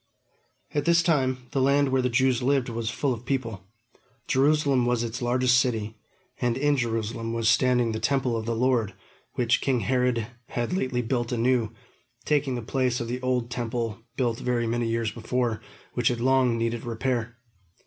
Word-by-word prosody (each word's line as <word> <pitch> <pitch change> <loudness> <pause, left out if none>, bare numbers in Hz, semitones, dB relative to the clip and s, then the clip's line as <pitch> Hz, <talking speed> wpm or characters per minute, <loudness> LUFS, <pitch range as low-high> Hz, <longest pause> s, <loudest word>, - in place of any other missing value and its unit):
At 145 - 0
this 170 0 +4
time, 130 -6 +1
the 135 - 0
land 140 +1 +3
where 130 0 +2
the 125 - 0
Jews 130 0 +2
lived 130 -1 +1
was 115 -1 -3
full 130 +2 0
of 115 0 -8
people. 115 -8 -3 0.6
Jerusalem 140 -2 +3
was 120 -1 +1
its 120 +1 -4
largest 125 +1 +3
city, 110 -4 -1 0.4
and 120 -1 0
in 145 +1 +2
Jerusalem 115 -2 -2
was 115 -1 0
standing 120 +1 +3
the 110 - -3
Temple 130 +1 +1
of 110 0 -3
the 115 - 0
Lord, 115 -5 +1 0.4
which 120 0 +2
king 130 -4 +1
Herod 125 0 +1 0.2
had 120 +6 -3
lately 130 -9 -1
built 120 0 -1
anew, 120 -2 +1 0.5
taking 145 -3 +1
the 120 - -4
place 125 0 0
of 115 - -4
the 125 +1 -3
old 125 -2 -1
Temple 115 -2 -3 0.2
built 120 -3 0
very 120 -1 0
many 120 0 -1
years 115 -1 -1
before, 115 0 -2 0.3
which 120 -2 0
had 120 -2 +1
long 130 -1 +3
needed 115 0 -2
repair. 115 0 -2
120 Hz, 175 wpm, -26 LUFS, 115-130 Hz, 0.6 s, this